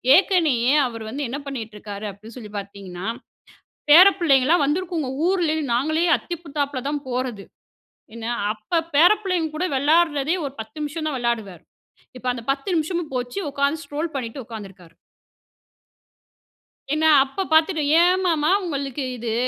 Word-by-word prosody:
ஏற்கனயே 310 Hz, -9 st, +3 dB
அவர் 230 Hz, -2 st, -7 dB
வந்து 280 Hz, +5 st, -4 dB
என்ன 275 Hz, +4 st, -4 dB
பண்ணீட்டுருக்கிறாரு 215 Hz, -5 st, -6 dB
அப்படீன்னு 215 Hz, +5 st, -13 dB
சொல்லி 215 Hz, -4 st, -9 dB
பார்த்தீங்கன்னா, 195 Hz, -2 st, -7 dB, 0.8 s
பேர 350 Hz, +6 st, +10 dB
பிள்ளைங்க 275 Hz, -7 st, +4 dB
எல்லாம் 325 Hz, -1 st, +4 dB
வந்திருக்குங்க. 330 Hz, 0 st, -1 dB, 0.2 s
ஊரிலே 350 Hz, -4 st, +1 dB, 0.2 s
நாங்களே 315 Hz, +7 st, +1 dB
அத்திபூத்தாப்பில 290 Hz, -5 st, -4 dB
தான் 290 Hz, -1 st, -3 dB
போறது. 245 Hz, -5 st, -3 dB, 0.7 s
என்ன 230 Hz, -1 st, -7 dB, 0.3 s
அப்போ 215 Hz, +11 st, -3 dB, 0.2 s
பேர 335 Hz, +6 st, +7 dB
பிள்ளைங்க 360 Hz, -5 st, 0 dB
கூட 340 Hz, +4 st, -1 dB
விளையாடுறதே 300 Hz, +2 st, +2 dB
ஒரு 270 Hz, -, -5 dB
10 220 Hz, 0 st, -8 dB
நிமிஷம் 305 Hz, +2 st, -4 dB
தான் 290 Hz, -3 st, -2 dB
விளையாடுவார். 225 Hz, -8 st, -3 dB, 0.5 s
இப்ப 250 Hz, -, -14 dB
அந்த 240 Hz, -2 st, -7 dB
10 275 Hz, +5 st, -4 dB
நிமிஷமும் 330 Hz, 0 st, -2 dB
போச்சு, 250 Hz, +8 st, -3 dB
உட்காந்து 280 Hz, +3 st, 0 dB
ஸ்க்ரோல் 310 Hz, +2 st, -4 dB
பண்ணிட்டு 255 Hz, 0 st, -5 dB
உக்கார்ந்திருக்கார். 195 Hz, -7 st, -11 dB, 2.0 s
என்ன 310 Hz, +1 st, +1 dB, 0.2 s
அப்ப 280 Hz, +8 st, -4 dB
பார்த்துட்டு, 315 Hz, +1 st, +3 dB, 0.2 s
ஏன் 365 Hz, +2 st, +3 dB
மாமா 310 Hz, -3 st, +1 dB, 0.2 s
உங்களுக்கு 280 Hz, -4 st, -3 dB
இது? 230 Hz, -1 st, -3 dB
280 Hz, 135 wpm, -22 LUFS, 230-320 Hz, 2.0 s, பேர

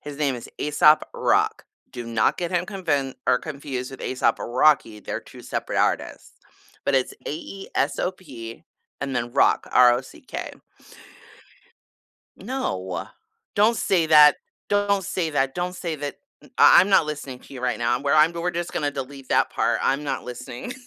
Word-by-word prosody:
his 145 Hz, -1 st, -8 dB
name 140 Hz, -3 st, 0 dB
is 120 Hz, -, -9 dB
Aesop 150 Hz, +1 st, +4 dB
Rock. -, -, +1 dB, 0.3 s
Do 120 Hz, -1 st, -7 dB
not 115 Hz, -2 st, +1 dB
get 175 Hz, -1 st, -3 dB
him 175 Hz, 0 st, +1 dB
convin 150 Hz, -10 st, -2 dB
or 125 Hz, -, +4 dB
confused 140 Hz, -4 st, -6 dB
with 135 Hz, -, -10 dB
A$AP 130 Hz, -, 0 dB
Rocky, 120 Hz, -3 st, +2 dB
they're -, -, -5 dB
2 -, -, -14 dB
separate -, -, -3 dB
artists. -, -, -1 dB, 0.5 s
But -, -, +1 dB
it's 130 Hz, -1 st, +1 dB
A-E-S-O-P 155 Hz, -7 st, -4 dB, 0.4 s
and 135 Hz, -2 st, -3 dB
then 120 Hz, 0 st, -3 dB
rock, 140 Hz, -, +3 dB
R-O-C-K. 125 Hz, -, +2 dB, 1.8 s
No, 95 Hz, -, -4 dB, 0.5 s
don't 215 Hz, +3 st, +3 dB
say 175 Hz, -6 st, +1 dB
that. 150 Hz, -2 st, +7 dB, 0.3 s
Don't 200 Hz, -1 st, +1 dB
say 165 Hz, -2 st, -2 dB
that 135 Hz, -2 st, 0 dB
don't 180 Hz, 0 st, -3 dB
say 170 Hz, -3 st, -4 dB
that 145 Hz, -1 st, -5 dB, 0.3 s
m -, -, -18 dB
I -, -, +8 dB
I'm 190 Hz, -, +2 dB
not 190 Hz, -5 st, +4 dB
listening 145 Hz, -4 st, -6 dB
to -, -, -14 dB
you 130 Hz, -, -7 dB
right 125 Hz, -1 st, -1 dB
now, 120 Hz, +1 st, +1 dB
I'm 125 Hz, -, -3 dB
where 140 Hz, +1 st, +2 dB
I'm 155 Hz, +2 st, +5 dB
we're 170 Hz, +1 st, -2 dB
just 175 Hz, 0 st, -4 dB
gonna 150 Hz, -5 st, -1 dB
delete 135 Hz, -1 st, -8 dB
that -, -, +3 dB
part, -, -, 0 dB
I'm 140 Hz, +2 st, +1 dB
not 135 Hz, -2 st, -3 dB
listening. 125 Hz, -, -7 dB
145 Hz, 165 wpm, -24 LUFS, 125-170 Hz, 1.8 s, I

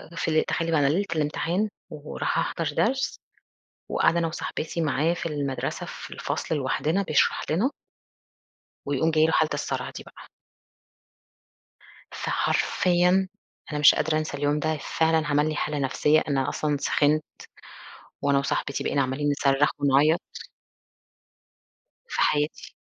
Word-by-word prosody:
في 155 Hz, -1 st, +1 dB
تخيّلي 165 Hz, -1 st, -2 dB
بقى 160 Hz, -, +3 dB
أنا 140 Hz, -, +3 dB
ليلة 175 Hz, +8 st, +1 dB
الإمتحان 165 Hz, +7 st, 0 dB, 0.2 s
ورايحه 150 Hz, -1 st, -3 dB
أحضر 165 Hz, -2 st, -2 dB
درس 265 Hz, +4 st, 0 dB, 0.7 s
وقاعدة 170 Hz, -, +2 dB
أنا 170 Hz, -, +1 dB
وصاحبتي 160 Hz, 0 st, -4 dB
معايا 160 Hz, +2 st, +1 dB
في 175 Hz, -, -5 dB
المَدرسة 145 Hz, -4 st, -3 dB
في -, -, -9 dB
الفصل -, -, -3 dB
لوحدنا 150 Hz, +6 st, 0 dB
بيشرح 155 Hz, -6 st, +2 dB
لنا. 195 Hz, -, +2 dB, 1.2 s
ويقوم 145 Hz, +3 st, +1 dB
جاي 155 Hz, 0 st, +4 dB
له 160 Hz, -, 0 dB
حالة 155 Hz, -1 st, +2 dB
الصَرَع -, -, -3 dB
دي -, -, -9 dB
بقى. -, -, -15 dB, 1.8 s
فحرفيًا 180 Hz, +1 st, +1 dB, 0.4 s
أنا 150 Hz, -, -1 dB
مش 145 Hz, -, +8 dB
قادرة 155 Hz, -1 st, 0 dB
أنسى 155 Hz, -2 st, -3 dB
اليوم 145 Hz, +1 st, 0 dB
ده، 155 Hz, 0 st, -1 dB, 0.2 s
فعلًا 160 Hz, -1 st, +3 dB
عمل 150 Hz, +1 st, +2 dB
لي 155 Hz, -, -2 dB
حالة 150 Hz, 0 st, -2 dB
نفسية، 150 Hz, +3 st, +2 dB
أنا 135 Hz, -2 st, 0 dB
أصلًا 150 Hz, -1 st, -1 dB
سِخِنت 150 Hz, +2 st, +2 dB, 1.0 s
وأنا 140 Hz, 0 st, +3 dB
وصاحبتي 140 Hz, 0 st, -2 dB
بقينا 140 Hz, -, +1 dB
عاملين 135 Hz, +3 st, -1 dB
نِصرَّخ 140 Hz, 0 st, +2 dB
ونعيَّط. 145 Hz, +4 st, +3 dB, 1.9 s
في -, -, -2 dB
حياتي. 150 Hz, +1 st, 0 dB
155 Hz, 130 wpm, -25 LUFS, 145-165 Hz, 1.9 s, مش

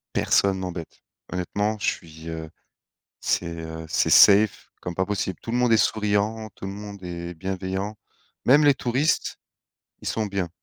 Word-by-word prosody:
Personne 95 Hz, -1 st, +3 dB
m'embête. 90 Hz, -3 st, -6 dB, 0.3 s
Honnêtement, 100 Hz, +4 st, -1 dB
je -, -, -2 dB
suis, 80 Hz, 0 st, -4 dB
heu, 80 Hz, -1 st, -5 dB, 0.7 s
c'est, 90 Hz, -, 0 dB
heu, 80 Hz, 0 st, -7 dB
c'est -, -, +1 dB
safe, 100 Hz, +1 st, +6 dB
comme 90 Hz, -, -5 dB
pas 95 Hz, +1 st, 0 dB
possible. 95 Hz, -3 st, -2 dB
Tout 115 Hz, -, -6 dB
le -, -, +1 dB
monde 125 Hz, -1 st, +3 dB
est -, -, +7 dB
souriant, 110 Hz, +1 st, +1 dB
tout -, -, -9 dB
le 95 Hz, -, -4 dB
monde 100 Hz, 0 st, -8 dB
est 85 Hz, 0 st, -5 dB
bienveillant, 95 Hz, +4 st, -3 dB, 0.5 s
même 145 Hz, +4 st, +6 dB
les 145 Hz, -2 st, +6 dB
touristes, 135 Hz, +6 st, 0 dB, 0.6 s
ils -, -, -6 dB
sont 110 Hz, -, 0 dB
bien. 95 Hz, -4 st, -2 dB
100 Hz, 165 wpm, -25 LUFS, 90-110 Hz, 0.7 s, est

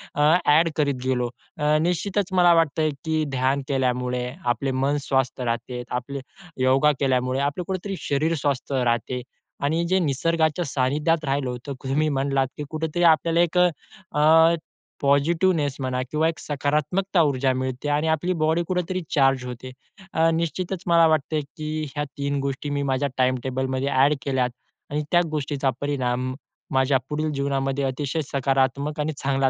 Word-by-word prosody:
अ, 145 Hz, -, 0 dB, 0.2 s
add 160 Hz, +3 st, +5 dB
करत 145 Hz, -3 st, +1 dB
गेलो. 125 Hz, -2 st, 0 dB, 0.3 s
अ, 150 Hz, 0 st, +2 dB
निश्चितच 185 Hz, +4 st, 0 dB
मला 175 Hz, -1 st, +6 dB
वाटतंय, 160 Hz, -1 st, +2 dB, 0.2 s
की 160 Hz, -1 st, +1 dB
ध्यान 135 Hz, +2 st, +1 dB
केल्यामुळे 125 Hz, -2 st, 0 dB, 0.2 s
आपले 130 Hz, +3 st, 0 dB
मन 135 Hz, +3 st, +1 dB
स्वस्थ 130 Hz, -2 st, 0 dB
राहते, 120 Hz, +1 st, -3 dB
आपले 130 Hz, +3 st, -4 dB, 0.4 s
योगा 135 Hz, +3 st, +4 dB
केल्यामुळे 130 Hz, -1 st, +1 dB
आपलं 145 Hz, +5 st, -1 dB
कुठेतरी 190 Hz, +1 st, -3 dB
शरीर 155 Hz, +4 st, 0 dB
स्वस्थ 140 Hz, -1 st, -1 dB
राहते 125 Hz, 0 st, 0 dB, 0.4 s
आणि 160 Hz, +4 st, +1 dB
जे 190 Hz, +1 st, +3 dB
निसर्गाच्या 160 Hz, +2 st, +1 dB
सानिध्यात 150 Hz, +4 st, 0 dB
राहिलं 135 Hz, -1 st, 0 dB
होतं. 125 Hz, +3 st, -5 dB
तुम्ही 150 Hz, +4 st, +1 dB
म्हटलात, 135 Hz, -1 st, +1 dB
की 150 Hz, -, -4 dB
कुठेतरी 160 Hz, +2 st, -2 dB
आपल्याला 165 Hz, +1 st, -1 dB
एक 175 Hz, +1 st, +1 dB, 0.6 s
अ, 160 Hz, +2 st, +6 dB, 0.5 s
पॉझिटिव्हनेस 145 Hz, +1 st, +2 dB
म्हणा 130 Hz, -1 st, -1 dB
किंवा 155 Hz, +1 st, +2 dB
एक 160 Hz, -, -6 dB
सकारात्मक 150 Hz, +7 st, -1 dB
ऊर्जा 140 Hz, -4 st, +3 dB
मिळते 130 Hz, +2 st, -3 dB
आणि 150 Hz, +2 st, +1 dB
आपली 160 Hz, +4 st, +1 dB
बॉडी 160 Hz, +2 st, +2 dB
कुठेतरी 185 Hz, 0 st, -1 dB
चार्ज 135 Hz, -3 st, +3 dB
होते. 125 Hz, +1 st, -7 dB, 0.4 s
अ, 165 Hz, +1 st, +3 dB
निश्चितच 170 Hz, +3 st, -2 dB
मला 170 Hz, -1 st, +6 dB
वाटतं 155 Hz, 0 st, +1 dB, 0.2 s
की 155 Hz, 0 st, -3 dB
ह्या 145 Hz, -, -1 dB
3 140 Hz, 0 st, -1 dB
गोष्टी 140 Hz, +1 st, -3 dB
मी 140 Hz, 0 st, -1 dB
माझ्या 140 Hz, +2 st, 0 dB
टाईमटेबलमध्ये 130 Hz, +1 st, 0 dB
ॲड 140 Hz, +2 st, +4 dB
केल्यात 130 Hz, -3 st, +1 dB, 0.4 s
आणि 150 Hz, -, 0 dB
त्या 175 Hz, 0 st, +5 dB
गोष्टीचा 145 Hz, -2 st, -1 dB
परिणाम 130 Hz, -3 st, -1 dB, 0.4 s
माझ्या 130 Hz, 0 st, +3 dB
पुढील 155 Hz, +1 st, -1 dB
जीवनामध्ये 135 Hz, 0 st, -1 dB
अतिशय 140 Hz, +4 st, -2 dB
सकारात्मक 140 Hz, +2 st, 0 dB
आणि 155 Hz, +1 st, -1 dB
चांगला 135 Hz, -1 st, +1 dB
140 Hz, 150 wpm, -24 LUFS, 130-160 Hz, 0.6 s, मला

